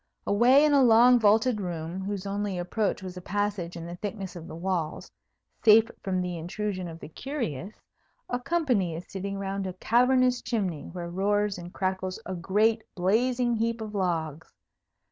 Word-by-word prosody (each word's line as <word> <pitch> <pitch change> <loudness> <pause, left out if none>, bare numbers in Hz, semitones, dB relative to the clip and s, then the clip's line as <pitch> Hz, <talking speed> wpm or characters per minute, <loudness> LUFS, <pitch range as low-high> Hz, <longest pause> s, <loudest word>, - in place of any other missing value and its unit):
Away 250 +8 +5
in 300 - +3
a 280 - +6
long 245 +1 +6
vaulted 220 +1 +3
room, 170 -1 -4
whose 200 0 -4
only 200 -1 -2
approach 190 +3 -1
was 185 -1 -7
a - - -6
passage 200 -3 -2
in 165 - -7
the 175 +1 -7
thickness 195 -2 -5
of 170 -1 -8
the - - -8
walls, 170 -2 -3 0.5
safe 220 +1 +6
from 185 -2 -1
the 180 -2 -4
intrusion 185 +2 -4
of 165 -1 -9
the 150 - -9
curious, 210 - -5 0.5
a 245 - -2
company 250 - 0
is 170 - -7
sitting 195 0 -5
round 195 0 -3
a 185 - -4
cavernous 250 +5 +3
chimney, 190 - -2
where 175 0 -5
roars 205 +1 0
and 175 0 -9
crackles 185 0 -2
a 190 - -4
great 210 +5 +2
blazing 240 +6 +1
heap 230 +1 -1
of 215 -1 -6
logs. 165 -5 -2
195 Hz, 170 wpm, -27 LUFS, 180-225 Hz, 0.5 s, a